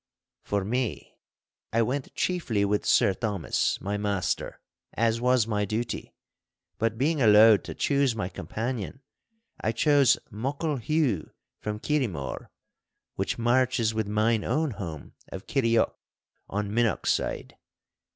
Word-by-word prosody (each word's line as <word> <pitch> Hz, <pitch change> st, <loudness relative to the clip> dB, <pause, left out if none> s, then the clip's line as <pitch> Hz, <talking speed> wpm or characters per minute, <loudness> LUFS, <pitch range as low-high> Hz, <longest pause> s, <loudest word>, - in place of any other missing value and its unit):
For 100 Hz, -2 st, -2 dB
me, 125 Hz, +2 st, -3 dB, 0.5 s
I 115 Hz, +1 st, +3 dB
went 130 Hz, +4 st, -3 dB
chiefly 125 Hz, -, 0 dB
with 105 Hz, +1 st, 0 dB
Sir 95 Hz, -, +4 dB
Thomas, 105 Hz, -4 st, -1 dB
my 100 Hz, +1 st, -2 dB
master, 100 Hz, -3 st, -2 dB, 0.4 s
as 115 Hz, 0 st, +1 dB
was 125 Hz, -2 st, +3 dB
my 105 Hz, -2 st, -1 dB
duty; 110 Hz, +4 st, -3 dB, 0.6 s
but 115 Hz, 0 st, 0 dB
being 150 Hz, +4 st, +1 dB
allowed 110 Hz, -1 st, +7 dB
to -, -, -6 dB
choose 140 Hz, -4 st, +1 dB
my 105 Hz, -5 st, -2 dB
companion, 110 Hz, -, -5 dB, 0.6 s
I 110 Hz, -, +1 dB
chose 140 Hz, +3 st, +4 dB
Muckle 140 Hz, +7 st, -2 dB
Hugh 130 Hz, -, 0 dB, 0.3 s
from 105 Hz, 0 st, -4 dB
Kirriemore, 110 Hz, -, -2 dB, 0.6 s
which -, -, -2 dB
marches 120 Hz, -1 st, +2 dB
with 110 Hz, -1 st, -1 dB
mine 110 Hz, +1 st, +1 dB
own 155 Hz, -1 st, 0 dB
home 85 Hz, -, -7 dB, 0.2 s
of 95 Hz, -, -7 dB
Kirrieoch 115 Hz, -5 st, +2 dB, 0.6 s
on 100 Hz, 0 st, -2 dB
Minnochside. 115 Hz, -3 st, 0 dB
115 Hz, 120 wpm, -27 LUFS, 105-130 Hz, 0.6 s, allowed